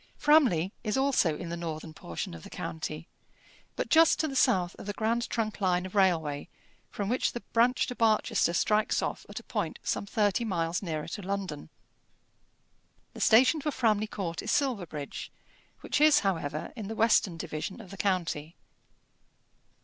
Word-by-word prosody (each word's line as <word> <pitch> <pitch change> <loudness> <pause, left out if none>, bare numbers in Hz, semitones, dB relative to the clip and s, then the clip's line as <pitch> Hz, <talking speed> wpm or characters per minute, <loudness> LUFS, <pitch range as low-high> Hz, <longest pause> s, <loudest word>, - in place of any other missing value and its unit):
Framley 240 - +4
is 215 +2 -1
also 260 - +2
in 175 - -6
the 170 - -3
northern 160 -2 -6
portion 85 - -6
of 85 - -9
the - - -11
county, 160 0 -5 0.7
but - - -2
just 325 0 +5
to 315 - +1
the 275 - -5
south 190 -10 +2
of - - -9
the 205 - -2
grand 230 +3 -1
trunk 215 -3 -2
line 180 -1 +1
of 185 - -8
railway 165 -7 +1 0.4
from 200 - -4
which 250 +4 0
the 240 - -5
branch 240 +2 +3
to 250 - -5
Barchester 220 -5 +2
strikes 210 +4 +2
off - - -4
at - - -6
a - - -15
point - - -3
some 200 - -2
thirty 210 +1 +1
miles 170 -5 -1
nearer 155 -5 -4
to 205 - -5
London. 190 -6 -4 1.4
The - - -8
station 255 +7 +5
for 300 - -1
Framley 220 -6 +1
Court 180 -6 -4
is 215 - -5
Silverbridge, 185 - -2 0.5
which - - -1
is, 300 -1 +6
however, 160 -6 -2
in 215 -5 -6
the 225 - -5
western 215 -6 +3
division 165 +5 -5
of 195 -5 -11
the 200 - -9
county. 170 -5 -1
200 Hz, 170 wpm, -29 LUFS, 165-230 Hz, 1.4 s, is